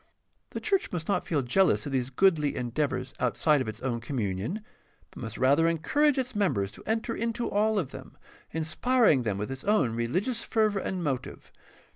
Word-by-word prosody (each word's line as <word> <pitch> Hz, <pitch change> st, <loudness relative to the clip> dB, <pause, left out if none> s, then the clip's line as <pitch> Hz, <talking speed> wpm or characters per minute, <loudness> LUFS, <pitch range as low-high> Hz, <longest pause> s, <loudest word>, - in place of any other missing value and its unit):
The -, -, -5 dB
church 395 Hz, -3 st, 0 dB
must 165 Hz, -3 st, -4 dB
not 200 Hz, -3 st, 0 dB
feel 145 Hz, -5 st, +1 dB
jealous 175 Hz, +9 st, +3 dB
of 145 Hz, -, -4 dB
these 130 Hz, -1 st, 0 dB
goodly 150 Hz, -1 st, +2 dB
endeavors 125 Hz, +1 st, -2 dB
outside 140 Hz, +4 st, +2 dB
of 130 Hz, -, -3 dB
its 110 Hz, +1 st, -6 dB
own 120 Hz, -3 st, -1 dB
communion, 115 Hz, -, -3 dB, 0.5 s
but -, -, -11 dB
must 115 Hz, -2 st, -6 dB
rather 140 Hz, +6 st, +4 dB
encourage 280 Hz, -, +2 dB
its 255 Hz, -3 st, -2 dB
members 130 Hz, -, +1 dB
to -, -, -13 dB
enter 225 Hz, +1 st, -1 dB
into 230 Hz, +1 st, -2 dB
all 215 Hz, +1 st, +1 dB
of 155 Hz, -9 st, -1 dB
them, -, -, -11 dB, 0.3 s
inspiring 160 Hz, -, +2 dB
them 105 Hz, -5 st, -1 dB
with 105 Hz, +5 st, -4 dB
its 135 Hz, 0 st, -6 dB
own 200 Hz, -, +2 dB
religious 185 Hz, -, -1 dB
fervor 215 Hz, -3 st, +1 dB
and 185 Hz, -2 st, -3 dB
motive. 135 Hz, -5 st, -4 dB
155 Hz, 180 wpm, -28 LUFS, 125-210 Hz, 0.5 s, rather